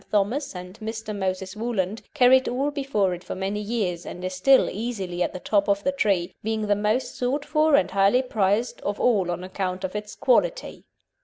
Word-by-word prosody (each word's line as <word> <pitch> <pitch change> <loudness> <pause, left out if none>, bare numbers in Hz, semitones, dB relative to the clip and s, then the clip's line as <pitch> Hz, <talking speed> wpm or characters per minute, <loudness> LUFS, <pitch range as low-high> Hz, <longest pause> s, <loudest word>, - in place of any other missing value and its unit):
Thomas 215 +6 0
and 180 +3 -9
Mr. 220 -1 -5
Moses 190 0 -3
Woolland, 215 -2 -2
carried 260 -1 +5
all 275 +4 -1
before 270 -10 0
it 175 +1 -7
for - - -6
many 195 +2 -2
years, 200 -6 -2
and 180 +1 -7
is 185 - -3
still 260 +9 +5
easily 195 -5 -4
at 175 - +1
the 185 - -7
top 200 +1 +1
of 200 0 +1
the 275 - +2
tree, 200 -10 0
being 220 0 -2
the 205 0 +2
most 215 +5 0
sought 270 +4 -1
for 305 -1 +3
and 185 -9 +2
highly 200 +6 +3
prized 215 0 0
of 205 0 -3
all 205 -8 +2
on 175 +1 -3
account 185 0 -3
of 190 +2 -4
its 210 0 -5
"quality." - - +1
210 Hz, 200 wpm, -25 LUFS, 185-245 Hz, -, carried